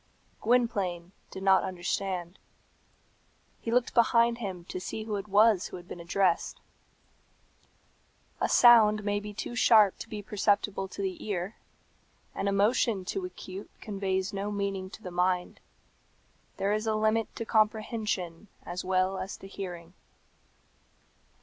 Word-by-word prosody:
Gwynplaine 205 Hz, -7 st, 0 dB, 0.2 s
did 190 Hz, -, -8 dB
not 190 Hz, -1 st, +5 dB
understand. 185 Hz, 0 st, -3 dB, 1.2 s
He -, -, -5 dB
looked 245 Hz, +1 st, +1 dB
behind 235 Hz, 0 st, +4 dB
him 185 Hz, -6 st, -5 dB
to 185 Hz, -, -5 dB
see 215 Hz, +4 st, -5 dB
who 215 Hz, -1 st, -3 dB
it 200 Hz, 0 st, -5 dB
was 210 Hz, -1 st, +4 dB
who -, -, -8 dB
had 175 Hz, 0 st, -13 dB
been 175 Hz, -, -8 dB
addressed. 175 Hz, +1 st, 0 dB, 1.8 s
A -, -, 0 dB
sound 215 Hz, -3 st, +6 dB
may 205 Hz, 0 st, 0 dB
be 210 Hz, 0 st, -7 dB
too 205 Hz, -, -6 dB
sharp 215 Hz, -5 st, +5 dB
to -, -, -8 dB
be 210 Hz, -1 st, -6 dB
perceptible 205 Hz, -1 st, 0 dB
to 200 Hz, +1 st, -6 dB
the 190 Hz, -1 st, -4 dB
ear; 195 Hz, -1 st, -3 dB, 0.8 s
an -, -, -2 dB
emotion 200 Hz, 0 st, +2 dB
too 380 Hz, -, -3 dB
acute 195 Hz, -, -8 dB
conveys 195 Hz, -1 st, -2 dB
no 200 Hz, +1 st, -3 dB
meaning 200 Hz, -2 st, -3 dB
to 220 Hz, -, -12 dB
the 180 Hz, -, -6 dB
mind. 180 Hz, 0 st, 0 dB, 1.0 s
There 200 Hz, +1 st, +1 dB
is 215 Hz, +1 st, -1 dB
a 220 Hz, -, +1 dB
limit 215 Hz, +1 st, +1 dB
to 230 Hz, -, -4 dB
comprehension 215 Hz, -5 st, 0 dB, 0.2 s
as 175 Hz, +1 st, -5 dB
well 185 Hz, +1 st, +1 dB
as 190 Hz, +1 st, -5 dB
to 195 Hz, -, -11 dB
hearing. 180 Hz, -3 st, -7 dB
200 Hz, 140 wpm, -29 LUFS, 185-215 Hz, 1.8 s, sound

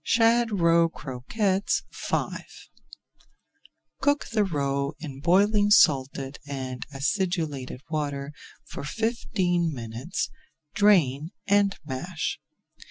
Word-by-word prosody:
SHAD 230 Hz, 0 st, +3 dB
ROE 170 Hz, 0 st, +4 dB
CROQUETTES 185 Hz, -, -1 dB
V -, -, -2 dB, 1.7 s
Cook 285 Hz, 0 st, +2 dB
the 215 Hz, -2 st, +3 dB
roe 140 Hz, -5 st, -1 dB
in 145 Hz, -4 st, -7 dB
boiling 205 Hz, +6 st, +3 dB
salted 135 Hz, -6 st, +3 dB
and 130 Hz, -3 st, -5 dB
acidulated 145 Hz, -3 st, -2 dB
water 145 Hz, -2 st, -3 dB, 0.3 s
for -, -, -8 dB
fifteen 180 Hz, -2 st, 0 dB
minutes, 120 Hz, +5 st, -4 dB, 0.4 s
drain, 170 Hz, -8 st, +3 dB, 0.2 s
and 200 Hz, 0 st, +3 dB
mash. 155 Hz, +5 st, -3 dB
165 Hz, 90 wpm, -26 LUFS, 140-200 Hz, 1.7 s, ROE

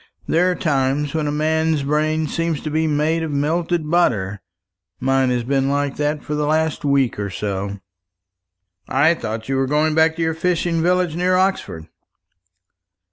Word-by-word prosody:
There 175 Hz, +3 st, +3 dB
are 180 Hz, -, 0 dB
times 140 Hz, -2 st, 0 dB
when 155 Hz, -2 st, -1 dB
a -, -, 0 dB
man's 160 Hz, 0 st, +1 dB
brain 155 Hz, +2 st, 0 dB
seems 165 Hz, 0 st, -2 dB
to 155 Hz, -, -4 dB
be 160 Hz, +1 st, +1 dB
made 155 Hz, +2 st, +1 dB
of 160 Hz, -, -3 dB
melted 160 Hz, +3 st, -1 dB
butter. 105 Hz, -, +1 dB, 0.6 s
Mine 135 Hz, 0 st, +2 dB
has 125 Hz, -1 st, 0 dB
been 135 Hz, +2 st, 0 dB
like 140 Hz, 0 st, -1 dB
that 150 Hz, 0 st, -1 dB
for 150 Hz, -, -4 dB
the 150 Hz, 0 st, -1 dB
last 160 Hz, 0 st, 0 dB
week 140 Hz, -6 st, +1 dB
or 100 Hz, -1 st, -2 dB
so." 100 Hz, 0 st, -4 dB, 1.1 s
"I 145 Hz, +5 st, +4 dB
thought 110 Hz, -7 st, -5 dB
you 135 Hz, 0 st, 0 dB
were 135 Hz, 0 st, +1 dB
going 150 Hz, +2 st, +1 dB
back 160 Hz, 0 st, +3 dB
to 165 Hz, -, -2 dB
your 160 Hz, 0 st, 0 dB
fishing 170 Hz, 0 st, 0 dB
village 180 Hz, -1 st, +1 dB
near 180 Hz, +1 st, +1 dB
Oxford." 185 Hz, -, -1 dB
150 Hz, 170 wpm, -20 LUFS, 135-160 Hz, 1.1 s, I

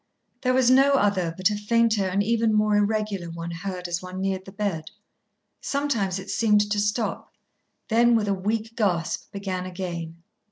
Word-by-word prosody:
There 255 Hz, -1 st, +2 dB
was 255 Hz, -1 st, +4 dB
no 270 Hz, +2 st, +5 dB
other 200 Hz, -9 st, +2 dB
but 185 Hz, +3 st, +2 dB
a -, -, -1 dB
fainter 220 Hz, 0 st, +2 dB
and 195 Hz, +2 st, +1 dB
even 225 Hz, 0 st, +2 dB
more 210 Hz, 0 st, +3 dB
irregular 205 Hz, -3 st, 0 dB
one 165 Hz, 0 st, -6 dB
heard 180 Hz, +1 st, -5 dB
as 175 Hz, 0 st, -2 dB
one 185 Hz, 0 st, -7 dB
neared 190 Hz, -1 st, -2 dB
the 190 Hz, -, -10 dB
bed. 195 Hz, -6 st, -3 dB, 0.8 s
Sometimes 235 Hz, -10 st, -1 dB
it 190 Hz, +1 st, -6 dB
seemed 210 Hz, -2 st, +2 dB
to 205 Hz, -, +1 dB
stop, 210 Hz, +1 st, -1 dB, 0.6 s
then, 235 Hz, +1 st, +4 dB
with 215 Hz, -2 st, +1 dB
a 200 Hz, -, +2 dB
weak 220 Hz, +4 st, -2 dB
gasp, 180 Hz, -8 st, -1 dB
begin 190 Hz, -2 st, -4 dB
again. 170 Hz, -3 st, -6 dB
205 Hz, 170 wpm, -25 LUFS, 185-220 Hz, 0.8 s, no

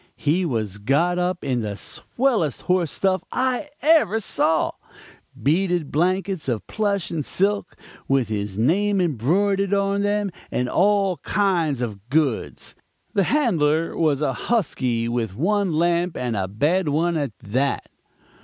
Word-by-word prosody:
He 170 Hz, +5 st, +1 dB
was 110 Hz, -, -2 dB
got 155 Hz, +11 st, +1 dB
up 180 Hz, 0 st, -1 dB
in 125 Hz, -3 st, 0 dB
the 105 Hz, -2 st, -4 dB
swellest 235 Hz, -, -1 dB
horse 180 Hz, -3 st, +1 dB
stuff 190 Hz, -1 st, 0 dB
I 260 Hz, +3 st, -1 dB
ever 300 Hz, -, +4 dB
saw 160 Hz, -6 st, +1 dB, 0.7 s
beaded 175 Hz, +1 st, +1 dB
blankets 185 Hz, 0 st, 0 dB
of 115 Hz, -3 st, -2 dB
plush 200 Hz, -4 st, -1 dB
and 160 Hz, -3 st, -2 dB
silk, 200 Hz, +5 st, 0 dB, 0.3 s
with 135 Hz, -4 st, +2 dB
his 105 Hz, -2 st, -3 dB
name 195 Hz, -, +2 dB
embroidered 190 Hz, -, +1 dB
on 200 Hz, 0 st, +1 dB
them, 205 Hz, -1 st, 0 dB, 0.2 s
and 125 Hz, -, -1 dB
all 195 Hz, +2 st, +2 dB
that -, -, -42 dB
kind 175 Hz, -, +1 dB
of 110 Hz, -2 st, -5 dB
goods. 140 Hz, -5 st, -1 dB, 0.4 s
The 200 Hz, -2 st, +2 dB
handler 165 Hz, -, +1 dB
was 155 Hz, -4 st, +1 dB
a 135 Hz, -3 st, +1 dB
husky 125 Hz, -, -1 dB
with 115 Hz, -5 st, -2 dB
one 195 Hz, -, +1 dB
lamp 170 Hz, +2 st, +1 dB
and 120 Hz, -3 st, -2 dB
a 95 Hz, -2 st, -1 dB
bad 150 Hz, -, +1 dB
one 165 Hz, +4 st, +1 dB
at 140 Hz, -10 st, -3 dB
that. 130 Hz, +9 st, -1 dB
170 Hz, 145 wpm, -23 LUFS, 130-195 Hz, 0.7 s, ever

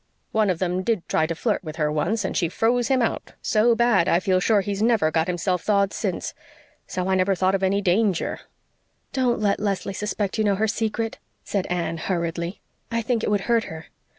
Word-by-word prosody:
One 215 Hz, -2 st, +2 dB
of 180 Hz, -, +1 dB
them 180 Hz, +1 st, -1 dB
did 210 Hz, -2 st, -1 dB
try 160 Hz, -, +1 dB
to 165 Hz, -, -3 dB
flirt 215 Hz, +3 st, -1 dB
with 155 Hz, -2 st, -7 dB
her 150 Hz, -2 st, 0 dB
once 190 Hz, +8 st, 0 dB
and -, -, -3 dB
she 170 Hz, -4 st, +1 dB
froze 235 Hz, +5 st, +1 dB
him 260 Hz, -3 st, +2 dB
out 230 Hz, -, -2 dB
so 230 Hz, -1 st, +3 dB
bad, 225 Hz, -7 st, +3 dB
I 170 Hz, -, +4 dB
feel 185 Hz, 0 st, +2 dB
sure 205 Hz, +2 st, +3 dB
he's 200 Hz, +1 st, -3 dB
never 220 Hz, -8 st, +3 dB
got 160 Hz, 0 st, +1 dB
himself 180 Hz, 0 st, 0 dB
thawed 200 Hz, -2 st, +2 dB
since. -, -, -3 dB, 0.5 s
So 185 Hz, 0 st, -3 dB
I 190 Hz, -, +2 dB
never 190 Hz, +1 st, +2 dB
thought 185 Hz, +1 st, +2 dB
of 195 Hz, -, 0 dB
any 195 Hz, +1 st, +1 dB
danger." 190 Hz, 0 st, +1 dB, 0.7 s
"Don't 255 Hz, -3 st, +1 dB
let 205 Hz, -2 st, +1 dB
Leslie 195 Hz, -1 st, -2 dB
suspect 210 Hz, +1 st, -2 dB
you -, -, +3 dB
know 205 Hz, -2 st, +2 dB
her 220 Hz, +3 st, +1 dB
secret," 225 Hz, +1 st, -2 dB, 0.2 s
said 195 Hz, -3 st, -2 dB
Anne 175 Hz, -2 st, -2 dB
hurriedly. 170 Hz, +1 st, -3 dB, 0.3 s
"I 230 Hz, 0 st, 0 dB
think 230 Hz, -1 st, 0 dB
it -, -, 0 dB
would 205 Hz, -1 st, +1 dB
hurt 230 Hz, +1 st, +1 dB
her." 160 Hz, 0 st, -9 dB
195 Hz, 210 wpm, -24 LUFS, 180-220 Hz, 0.7 s, I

